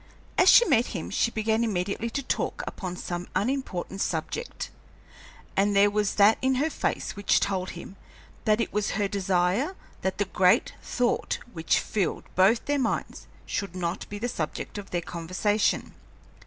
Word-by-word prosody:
As 365 - +6
she 480 - +8
met 245 - +3
him 165 - -6
she 230 - +2
began 220 0 0
immediately 205 +1 -1
to 280 +4 -3
talk - - -2
upon 180 -2 -5
some 175 0 -4
unimportant 200 -6 -2
subject, 475 - -3 0.8
and 200 +1 +2
there 200 +1 +5
was 210 -1 0
that 210 +2 +5
in 260 0 +2
her 300 +5 +1
face - - -2
which 200 -1 +3
told 190 -2 -1
him 190 +3 -10 0.5
that 215 0 +3
it - - -1
was 210 0 0
her 205 -1 +1
desire 195 - +1 0.3
that 190 - -1
the 205 - +1
great 185 -1 +3
thought 245 -1 0 0.2
which 160 -1 +1
filled 200 -5 -1
both 195 +5 +4
their 290 0 +1
minds 240 -4 -2 0.2
should 200 -3 -3
not 175 -1 -3
be 205 - -5
the 235 +4 -2
subject 170 0 -4
of 200 - -9
their 175 - -1
conversation. 185 +6 0
205 Hz, 165 wpm, -27 LUFS, 185-230 Hz, 0.8 s, she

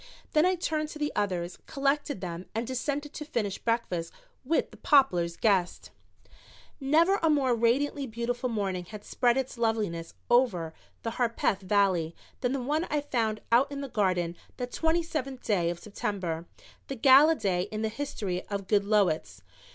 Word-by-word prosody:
Then 310 +2 +5
I 370 - +2
turned 310 -3 -2
to 310 - -8
the 295 0 -1
others, 180 -3 -2
collected 280 -3 0
them 175 0 -5
and 225 +2 -1
descended 285 +4 -3
to 300 - -5
finish 215 -9 -2
breakfast 205 -8 -1 0.3
with 315 +5 0
the - - -14
Poplars' 180 - +3
guests. 190 -5 +1 0.9
Never 325 +8 +3
a 325 - +3
more 275 -5 +3
radiantly 265 +5 +1
beautiful 240 +2 -2
morning 195 -5 -2
had 210 +3 -9
spread 240 0 +2
its 260 -2 -3
loveliness 210 -8 -1
over 210 -10 +2 0.3
the 230 0 -4
Harpeth 230 -4 +1
Valley 185 -4 +1 0.2
than 250 -2 0
the 270 -2 -2
one 305 +6 0
I 295 -1 0
found 225 -7 -1
out 260 +5 +4
in 280 0 -4
the 275 - -5
garden 180 -6 0 0.2
that 245 -1 -4
twenty 325 +1 +1
seventh 275 -5 -4
day 180 -6 +2
of 170 - -3
September, 180 -4 -4 0.4
the 275 - -4
gala 275 +6 +7
day 185 - 0
in 215 0 -3
the 220 - +1
history 215 -7 -3
of 200 -1 -4
Goodloets. 200 - +1
230 Hz, 165 wpm, -28 LUFS, 190-280 Hz, 0.9 s, gala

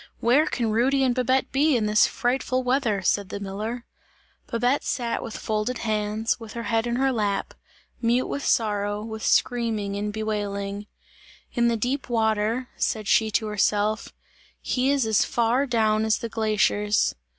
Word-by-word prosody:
"Where 265 +7 +3
can 230 -3 -1
Rudy 265 +5 +2
and 255 -2 +2
Babette 255 +1 +1
be 285 0 +3
in 215 - 0
this 210 0 +4
frightful 255 +1 -1
weather!" 250 -6 0
said 200 +1 +1
the 200 - -5
miller. 215 +5 -5 0.6
Babette 245 +4 +1
sat 235 -2 -2
with 225 - -6
folded 220 +3 -2
hands, 215 0 -1
with 225 -2 -9
her 235 - -5
head 225 +2 0
in 235 - -1
her 265 +1 +2
lap, 205 -5 -1 0.5
mute 240 +2 +2
with 280 - -4
sorrow, 205 -1 0
with 220 0 -6
screaming 220 -5 +1
and 210 +1 -2
bewailing. 205 -1 -3 0.7
"In 240 -1 +2
the 235 -1 +1
deep 255 +5 -2
water," 225 +2 0
said 215 -3 -1
she 220 0 +3
to 220 +1 0
herself, 210 0 0 0.5
"he 255 +1 0
is 280 -4 +2
as 220 -1 +3
far 240 +3 +1
down 220 -3 +2
as 220 0 +2
the 230 - -5
glaciers!" 215 -1 +1
225 Hz, 160 wpm, -25 LUFS, 210-245 Hz, 0.7 s, this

